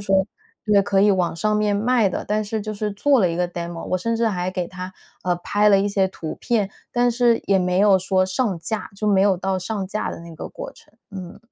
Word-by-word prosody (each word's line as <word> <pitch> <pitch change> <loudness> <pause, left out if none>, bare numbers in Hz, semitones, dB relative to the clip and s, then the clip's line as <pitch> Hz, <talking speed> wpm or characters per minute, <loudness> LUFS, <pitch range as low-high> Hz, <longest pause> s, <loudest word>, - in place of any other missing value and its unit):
说 195 -1 +2 0.4
对， 210 -2 +4
可 195 0 +2
以 210 - +5
网 180 -4 +1
上 210 +5 +1
面 210 -1 +1
卖 225 0 +2
的， 185 - -4
但 210 +1 0
是 215 0 -3
就 215 - -4
是 210 0 -3
做 270 +6 +3
了 185 - +3
一 165 - -3
个 180 0 +1
demo。 170 -1 -6
我 185 - +1
甚 230 +5 -1
至 230 0 +1
还 185 -4 -1
给 180 -1 -3
它， 185 +1 -8 0.3
呃， 180 -1 0
拍 205 +4 +2
了 200 -1 +6
一 200 - +1
些 195 -2 +1
图 160 -4 -6
片， 210 -5 0 0.2
但 245 0 +2
是 240 -1 +2
也 195 -1 +3
没 180 0 +1
有 200 -1 +5
说 185 0 +1
上 190 0 -1
架， 215 +6 -4
就 210 - -3
没 200 -2 +4
有 195 -1 +4
到 190 +1 -1
上 195 +1 -3
架 210 +3 -3
的 - - -7
那 170 -1 -11
个 - - -7
过 - - -8
程， - - -21 0.2
嗯。 185 -3 -8
195 Hz, 280 characters per minute, -22 LUFS, 185-215 Hz, 0.4 s, 了